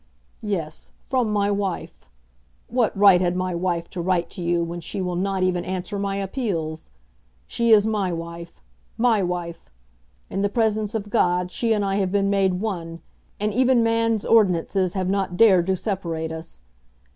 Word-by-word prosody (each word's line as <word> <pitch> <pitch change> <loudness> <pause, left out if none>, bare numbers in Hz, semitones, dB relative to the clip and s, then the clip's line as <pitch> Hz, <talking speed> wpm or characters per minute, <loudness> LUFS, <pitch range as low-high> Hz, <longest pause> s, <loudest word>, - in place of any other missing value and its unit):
"Yes; 175 -8 -4 0.2
from 250 -5 0
my 205 -1 +1
wife. 200 - -4 0.6
What 240 -3 0
right 195 -3 +6
had 175 -1 +1
my 185 0 -1
wife 170 -1 -1
to 180 - -4
write 175 -1 0
to - - -7
you 170 0 +1
when 170 +1 -5
she 170 - -5
will 180 -1 -2
not 190 +1 -1
even 180 -1 +1
answer 190 +2 -4
my 200 0 -2
appeals? 190 - -3 0.6
She 235 0 0
is 215 -2 +6
my 210 -4 0
wife; 170 - -7 0.3
my 225 -3 +3
wife! 175 - -4 0.6
In 195 - -3
the 200 - +1
presence 220 -1 0
of 205 -2 -4
God 180 0 +1
she 230 +3 0
and 210 -2 +2
I 195 0 0
have 190 -2 0
been 200 0 +1
made 195 -2 +2
one, 170 -5 -4 0.4
and 210 0 -1
even 255 0 +3
man's 230 -1 +1
ordinances 185 -3 +2
have 185 -2 -1
not 190 -2 -1
dared 190 -5 +5
to 190 - +2
separate 170 -5 -3
us. 160 - -8
190 Hz, 170 wpm, -23 LUFS, 175-210 Hz, 0.6 s, right